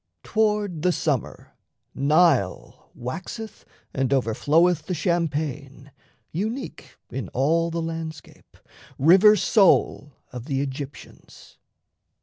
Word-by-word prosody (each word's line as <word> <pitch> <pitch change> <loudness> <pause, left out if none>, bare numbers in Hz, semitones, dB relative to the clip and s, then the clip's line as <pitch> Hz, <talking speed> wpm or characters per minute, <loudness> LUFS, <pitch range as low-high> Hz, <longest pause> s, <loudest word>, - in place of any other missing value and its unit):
Toward 210 -6 0
the 180 +2 +2
summer, 150 -8 -3 0.4
Nile 140 - +1
Waxeth 180 - -7 0.3
and 135 -1 -1
overfloweth 150 +6 +2
the 185 - -2
champaign, 150 -5 -3 0.4
Unique 220 - -5
in 120 -6 -5
all 165 +6 +1
the 165 0 -3
landscape, 160 -2 -8 0.4
river 190 +8 +6
sole 190 - +2 0.2
Of 125 -1 -8
the 135 -2 -2
Aegyptians. 140 +1 -10
160 Hz, 95 wpm, -24 LUFS, 135-180 Hz, 0.4 s, river